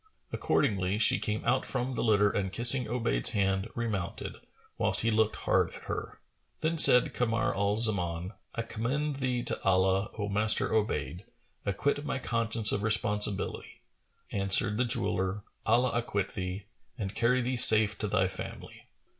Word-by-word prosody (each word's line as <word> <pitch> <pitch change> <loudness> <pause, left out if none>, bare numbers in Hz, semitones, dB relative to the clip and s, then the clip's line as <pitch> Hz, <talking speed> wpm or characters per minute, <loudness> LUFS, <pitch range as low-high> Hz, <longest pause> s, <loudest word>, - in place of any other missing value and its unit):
Accordingly, 100 -7 -2
she 110 - +3
came 105 0 -5
out 125 +2 0
from 125 +2 -4
the - - -4
litter 105 -2 +1
and 95 -2 -4
kissing 120 +4 +7
Obayd's 115 - +1
hand, 95 +1 -2
remounted, 110 -7 -6 0.4
whilst - - 0
he 115 - -1
looked 110 0 -1
hard - - -1
at - - -13
her. - - -8 0.4
Then 160 +1 -2
said 125 -4 +7
Kamar 125 +2 -2
al 100 +1 -2
Zaman, 90 -5 0 0.2
"I 115 - -4
commend 135 +6 -5
thee 125 -2 -3
to - - -5
Allah, 95 +2 0
O 105 -1 -4
Master 105 +2 +1
Obayd! 90 -4 -3 0.4
Acquit 140 +9 -3
my 150 - -5
conscience 115 -3 +1
of 100 - -3
responsibility.[FN#435]" 105 -2 -3
Answered 100 +1 +2
the 125 - -1
jeweller, 105 -5 -3 0.2
"Allah 120 +3 +1
acquit 105 -4 -4
thee! 95 +1 -7 0.3
and 100 -4 -6
carry 125 +3 -1
thee 125 +2 -3
safe 110 -3 +9
to 105 - -4
thy 95 -1 -1
family!" 95 0 -10
110 Hz, 155 wpm, -27 LUFS, 100-120 Hz, 0.4 s, safe